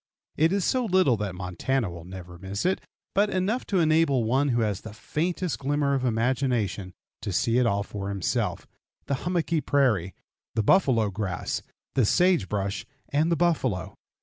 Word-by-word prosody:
It 160 +2 +3
is 195 -2 +1
so 255 -2 +1
little 185 - +4
that 100 -3 -3
Montana 100 +7 -1
will 85 -1 -9
never 90 -1 -9
miss 100 +2 -4
it, 185 +1 +1 0.3
but 205 +1 +3
enough 200 +7 -1
to 195 - +1
enable 155 -5 +3
one 135 +6 +2
who 120 -2 +2
has 105 -3 -1
the 110 - -9
faintest 170 +9 -2
glimmer 140 0 +1
of 135 -2 0
imagination 115 -6 0 0.3
to 100 - -3
see 115 +6 +2
it 125 - +3
all 100 -2 +1
for 100 -1 -5
himself 100 -3 -1 0.4
the - - -1 0.2
hummocky 170 -3 +1
prairie, 110 -13 +1 0.4
the 110 - +2
buffalo 115 - +4
grass, 95 -2 -3 0.3
the 130 - +3
sage 180 - +3
brush, 100 -1 -2 0.3
and 155 +4 +2
the - - +4
buffalo. 125 - 0
125 Hz, 170 wpm, -26 LUFS, 100-160 Hz, 0.4 s, little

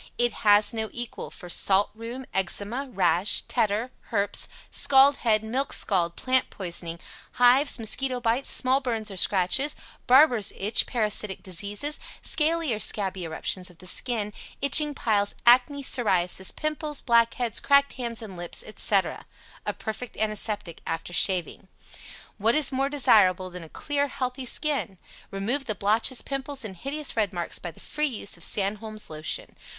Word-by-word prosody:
IT 240 0 +3
HAS 210 +1 +4
NO 220 -1 -3
EQUAL 240 -1 -6
for 180 - -12
Salt 195 +3 +2
rheum, 230 +4 -7
Eczema, 205 +8 -1
Rash, 190 -2 +3
Tetter 220 +4 -1 0.2
(Herps), 205 -3 +2 0.2
Scald 275 +1 +5
head, 220 -2 +1
Milk 255 +6 -2
scald, 170 -4 +1
Plant 260 0 +1
poisoning, 170 -3 -5 0.3
Hives, 250 +4 +4
Mosquito 250 +3 -1
bites, 240 +3 0
Small 260 +1 +3
burns 225 -5 -1
or 195 - -8
scratches, 200 +11 +2 0.3
Barbers' 250 -5 +5
Itch, 205 +3 +1
Parasitic 210 -4 0
diseases, 205 - -2 0.2
Scaly 320 -3 +1
or 215 - -4
scabby 190 -4 -1
eruptions 180 +3 -3
of 175 - -18
the 185 - -15
skin, 210 +1 -1 0.3
Itching 295 +1 +4
piles, 205 -5 0
Acne, 255 +4 +4
Psoriasis, 190 -7 +1
Pimples, 305 -1 -2
Blackheads, 235 -1 +1
Cracked 280 0 +3
hands 235 -2 -5
and 200 -4 -9
lips, 175 -1 -4
etc. 205 -2 0 0.4
A - - +1
perfect 225 +2 -7
antiseptic 215 -5 -1
after 165 +2 -4
shaving. 185 +1 0 0.7
WHAT 225 +5 +2
IS 305 -2 +3
MORE 270 +1 0
DESIRABLE 190 -10 +3
THAN 180 -2 -9
A - - -15
CLEAR, 285 - -2
HEALTHY 260 -1 -4
SKIN? 275 - -1 0.3
Remove 230 +8 -2
the 215 - -3
blotches, 220 +6 0
Pimples 275 -1 -3
and 195 -3 -7
hideous 285 - -2
red 210 -4 0
marks 175 -3 -2
by 175 - -6
the 165 - -15
free 300 0 -1
use 220 -6 -5
of 170 - -10
SANDHOLM'S 215 0 -1
LOTION. 155 0 -5
220 Hz, 150 wpm, -26 LUFS, 195-265 Hz, 0.7 s, Scald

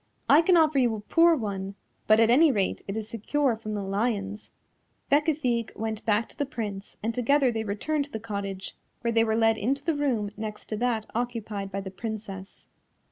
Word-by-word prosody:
I 290 +4 +7
can 350 +1 +4
offer 310 -3 +4
you 240 -3 +2
a - - -5
poor 330 +10 +4
one, 200 -6 -4 0.3
but 215 +1 +6
at 225 0 +5
any 300 +5 +6
rate 200 -6 0
it 195 +2 -3
is 215 -1 -4
secure 235 +4 0
from 215 -1 -5
the 205 - -3
lions." 205 0 -2 0.6
Bécafigue 280 -6 +1
went 220 -1 -3
back 220 +1 +2
to - - -15
the 290 - -1
Prince 210 -8 -6
and 225 +1 -1
together 260 +2 +3
they 225 -1 -2
returned 280 +9 -1
to 290 - -18
the 220 - -4
cottage, 200 -3 -5 0.3
where 235 - 0
they 225 0 +4
were 220 -1 +1
led 225 0 +3
into 275 +6 -1
the 330 - +2
room 250 -9 0
next 215 0 -6
to 215 - -2
that 230 -2 0
occupied 220 -4 -3
by 195 +1 -3
the 190 -1 -7
Princess. 200 -2 -7
225 Hz, 200 wpm, -27 LUFS, 205-260 Hz, 0.6 s, I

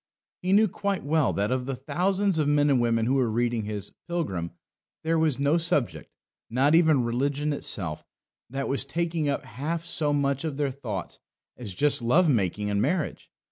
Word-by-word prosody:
He 185 - -1
knew 215 +2 +6
quite 200 0 -2
well 150 -1 +2
that 100 +3 0
of 130 0 -1
the 135 - -2
thousands 185 +6 0
of 150 - +2
men 145 0 +3
and 130 -3 +3
women 115 -1 +2
who 125 - +1
were 130 -4 +2
reading 115 -1 0
his 105 -2 -5 0.2
Pilgrim 100 - -2 0.5
there 165 0 +1
was 155 -5 +2
no 145 +4 +2
subject, 165 -7 -1 0.4
not 135 +6 +3
even 160 -6 +5
religion 140 +5 0
itself, 90 - -2 0.5
that 135 +2 -3
was 135 - 0
taking 165 +1 -1
up 140 - -2
half 155 +8 -4
so 160 -3 0
much 140 -1 0
of 155 -4 -3
their 145 -2 0
thoughts 115 -9 -6 0.4
as 105 -7 -8
just 145 +5 +1
love 155 +10 +4
making 105 - +1
and 100 0 +1
marriage. 180 +2 -1
140 Hz, 180 wpm, -26 LUFS, 120-160 Hz, 0.5 s, knew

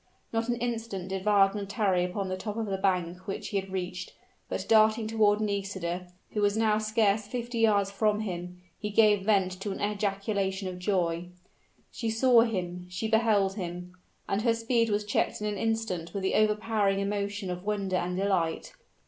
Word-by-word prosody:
Not 225 +1 0
an 240 - +2
instant 230 -6 -3
did 190 0 -4
Wagner 200 -1 +4
tarry 195 -3 +1
upon 190 +2 -2
the 185 - -2
top 210 +3 -5
of 225 - -1
the 195 -2 -2
bank 180 -1 -1
which 195 - -4
he 200 - -1
had 195 0 -8
reached; 185 -1 -4 0.4
but - - -3
darting 220 0 +5
toward 215 -2 +3
Nisida, 195 -4 -2 0.2
who 210 - -1
was 205 +1 +2
now 215 -1 +3
scarce 215 -1 +1
fifty 240 +1 -4
yards 205 -3 +3
from 210 +1 +1
him, 180 -3 -5 0.2
he 210 - -3
gave 210 -1 +4
vent 195 -3 +3
to 205 - -3
an - - -5
ejaculation 200 -1 -1
of 180 -1 -6
joy. 175 -3 0 0.6
She 230 - -3
saw 235 +1 +5
him 180 -6 -2
she 180 +5 -3
beheld 215 -3 +2
him: 180 -1 -5 0.3
and 195 - 0
her 230 0 +2
speed 230 0 +1
was 205 0 0
checked 205 - 0
in 210 - -4
an 205 -2 -2
instant 220 -6 -2
with 195 - -2
the 190 - +1
overpowering 215 -2 +2
emotion 200 -1 -2
of 180 0 -5
wonder 200 -3 -1
and 180 +1 -2
delight. 190 - 0
200 Hz, 180 wpm, -28 LUFS, 190-220 Hz, 0.6 s, darting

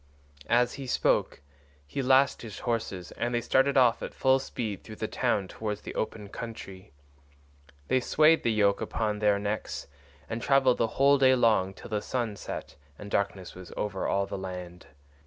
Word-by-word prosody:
As 120 +1 +3
he 135 - -6
spoke 95 - +1 0.4
he 70 - -4
lashed 130 +1 +4
his 110 -2 -8
horses 110 -6 -3
and 120 0 -2
they - - +2
started 135 +4 +2
off 120 -3 +4
at - - -6
full 130 0 +3
speed 110 -6 -5
through 110 - -10
the 110 - -3
town 100 -2 0
towards 105 +1 -4
the - - -7
open 110 -1 -4
country. 100 -7 -8 1.0
They 130 - +3
swayed 155 +5 +4
the 115 - +1
yoke 100 -2 +2
upon 105 -2 -2
their 105 -1 +3
necks 105 +1 -3 0.4
and 115 +1 -4
travelled 135 -2 +3
the 115 - +3
whole 140 +1 +5
day 130 -1 +6
long 110 -6 +2
till - - -11
the 105 -1 0
sun 120 -4 -2
set - - -7 0.2
and 100 0 -9
darkness 100 -2 -1
was 90 -2 -11
over 95 -2 -2
all 100 0 +1
the 100 0 -5
land. 90 -2 -7
110 Hz, 175 wpm, -28 LUFS, 100-125 Hz, 1.0 s, day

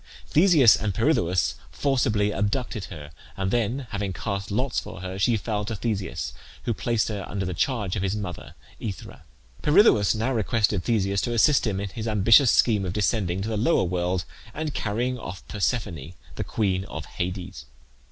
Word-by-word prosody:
Theseus 155 - +6
and 105 -3 -2
Pirithoeus 85 +3 +2 0.2
forcibly 110 -7 +1
abducted 105 +2 -2
her, 75 -5 -10 0.3
and 95 0 -1
then 120 +4 0
having 100 -2 -2
cast 100 0 -4
lots 125 +4 0
for 90 - -9
her, 95 +1 -5
she 115 +3 +3
fell 105 0 -2
to 110 - -3
Theseus, 105 -2 -3 0.3
who 120 - 0
placed 115 0 0
her 105 -3 -4
under 95 -1 -2
the 90 - -3
charge 105 0 -1
of 95 - -2
his 95 +1 -1
mother 95 -4 -6 0.3
AEthra. 100 - -7 0.4
Pirithoeus 150 - +5
now 115 +5 0
requested 105 -4 +1
Theseus 100 -4 +1
to 120 - -2
assist 130 +2 +4
him 100 -3 -1
in 100 0 -3
his 110 +3 -5
ambitious 110 +4 +5
scheme 105 -5 +3
of 90 -2 -3
descending 100 -3 0
to - - -3
the 110 - -1
lower 140 +11 +3
world 90 0 -1 0.3
and 155 -1 -3
carrying 120 +4 -1
off 95 -2 -8
Persephone, 90 - -2 0.2
the - - -3
queen 95 -4 -1
of 80 -4 -7
Hades. 90 -7 -5
105 Hz, 170 wpm, -25 LUFS, 95-115 Hz, 0.4 s, Theseus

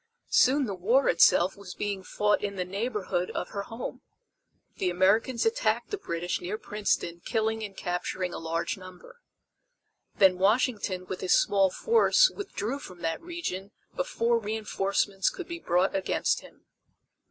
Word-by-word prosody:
Soon 275 +2 +4
the 205 - -3
war 225 +9 +2
itself 175 +2 +5
was 200 -3 -10
being 200 -2 -3
fought 210 +2 +1
in 200 -1 -2
the 180 -1 -2
neighborhood 195 -2 -2
of - - -3
her 200 - -4
home. 225 +4 -7 0.8
The 185 - 0
Americans 200 +7 +2
attacked 475 +3 0
the 410 - -1
British 170 +2 -3
near 190 +5 -3
Princeton 200 -6 -2
killing 220 -1 -1
and 200 -2 -7
capturing 180 0 -3
a - - -5
large 165 +3 -2
number. 185 - -13 0.9
Then 185 -2 +5
Washington 205 -3 +1
with 185 0 -6
his 185 - +4
small 195 -2 +3
force 460 - +4
withdrew 280 - -4
from 180 -10 -11
that 165 -1 -2
region 325 - -5 0.2
before 240 - +1
reenforcements 200 -2 0
could 370 - -8
be 340 0 -6
brought 180 - +1
against 195 - 0
him. - - -17
200 Hz, 150 wpm, -28 LUFS, 185-235 Hz, 0.9 s, itself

